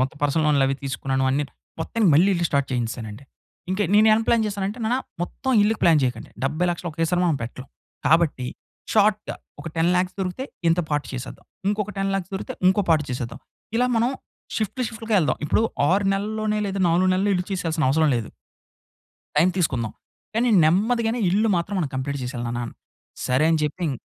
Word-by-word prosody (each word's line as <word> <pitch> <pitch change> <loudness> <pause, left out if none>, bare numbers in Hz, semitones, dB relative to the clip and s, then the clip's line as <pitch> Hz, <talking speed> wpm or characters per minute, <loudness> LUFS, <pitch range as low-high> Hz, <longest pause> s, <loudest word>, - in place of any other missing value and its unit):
మొత్తం 130 +3 -1
పర్సనల్ 155 +2 +2
లోన్‌లు 140 -3 +4
అవి 135 - +1
తీసుకున్నాను 135 0 -1
అన్ని. 145 +2 +1 0.4
మొత్తానికి 205 +1 +2
మళ్ళీ 180 +6 +5
ఇల్లు 170 0 0
స్టార్ట్ 140 -1 0
చేయించేసానండి. 115 0 -4 0.5
ఇంక 190 - -1 0.2
నేను 215 +1 +6
ఏం 220 - +4
ప్లాన్ 230 -1 +3
జేసానంటే, 200 +2 -3
నాన్న 240 +3 +1 0.3
మొత్తం 265 +8 -3
ఇల్లుకి 215 +1 +1
ప్లాన్ 165 -3 +6
చేయకండి. 125 -3 -2
70,00,000 170 +4 -1
ఒకేసారి 165 +3 0
మనం 165 -4 +2
పెట్టలేం. 125 +3 -7 0.4
కాబట్టి, 155 -5 +3 0.5
షార్ట్‌గా 210 0 +2 0.3
ఒక, 165 - -10
10,00,000 180 +2 +2
దొరికితే, 190 +9 -3 0.2
ఇంత 175 +2 +3
పార్ట్ 145 -1 0
చేసేద్దాం. 130 +1 -7 0.2
ఇంకొక 210 0 -1
10,00,000 195 -1 -1
దొరికితే, 190 - -5
ఇంకో 190 +2 +3
పార్ట్ 155 -2 +4
చేసేద్దాం. 125 +1 -5 0.4
ఇలా 250 +1 +3
మనం 235 +3 +2 0.5
షిఫ్ట్‌లు, 220 +4 -1
షిఫ్ట్‌లు‌గా 225 -1 -3
యేళ్దాం. 155 - +1
ఇప్పుడు 215 - +2 0.3
6 195 +2 +2
నెలల్లోనే, 215 +1 -1
లేదా 195 0 -1
4 180 +3 +3
నెలల్లో 200 +2 +2
ఇల్లు 180 0 -1
చేసేయాల్సిన 165 -4 -1
అవసరం 155 +2 +3
లేదు. 115 - -3 1.1
టైమ్ 165 +5 +5
తీసుకుందాం. 125 -10 0 0.4
కానీ, 240 +2 +2 0.2
నెమ్మదిగానే 225 +8 +2
ఇల్లు 215 +4 +2
మాత్రం 170 +4 -2
మనం 150 - -1
కంప్లీట్ 140 +2 -2
చేసేయాలి 125 -1 -4
నాన్న. 120 0 -4 0.5
సరే, 130 +4 +2
అని 160 - +3
చెప్పి 150 +4 -3
ఇం - - -1
175 Hz, 170 wpm, -23 LUFS, 140-205 Hz, 1.1 s, నేను